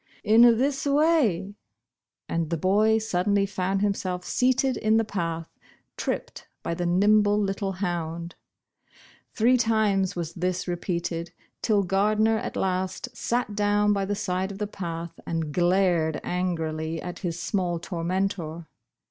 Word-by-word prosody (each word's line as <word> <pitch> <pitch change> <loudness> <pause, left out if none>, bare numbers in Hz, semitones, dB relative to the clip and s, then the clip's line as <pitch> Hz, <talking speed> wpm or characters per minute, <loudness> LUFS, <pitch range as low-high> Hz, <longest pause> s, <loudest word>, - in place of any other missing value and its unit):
"In 220 +2 +5 0.2
this 275 +3 0
way," 280 - +2 0.7
and 165 -2 -1
the 170 - -1
boy 210 +6 +3
suddenly 200 -1 +1
found 195 0 -1
himself 185 -3 -1
seated 255 +1 +2
in 220 0 +2
the 225 - +3
path 165 -5 -3 0.5
tripped - - -4 0.2
by - - -2
the 175 +1 -2
nim 205 +5 +4
ble 205 0 +2
little 195 -1 -1
hound! 170 -3 -3 1.0
Three 245 +3 +4
times 215 -5 +1
was 170 -2 -4
this 180 +1 -2
repeated, 175 -1 -3 0.3
till 205 -2 +2
Gardner 215 +4 +2
at - - -5
last 190 +6 -2
sat 235 -2 -1
down 205 0 +2
by 200 -1 0
the 205 +1 -1
side 185 0 -2
of 195 - -8
the 210 - -2
path 170 -4 -6
and 160 -3 -2
glared 175 -3 +2
anmlv 165 -3 -2
at 180 0 -6
his 175 -3 -3
small 175 -2 -1
tormentor. 170 -1 -3
190 Hz, 140 wpm, -26 LUFS, 175-210 Hz, 1.0 s, In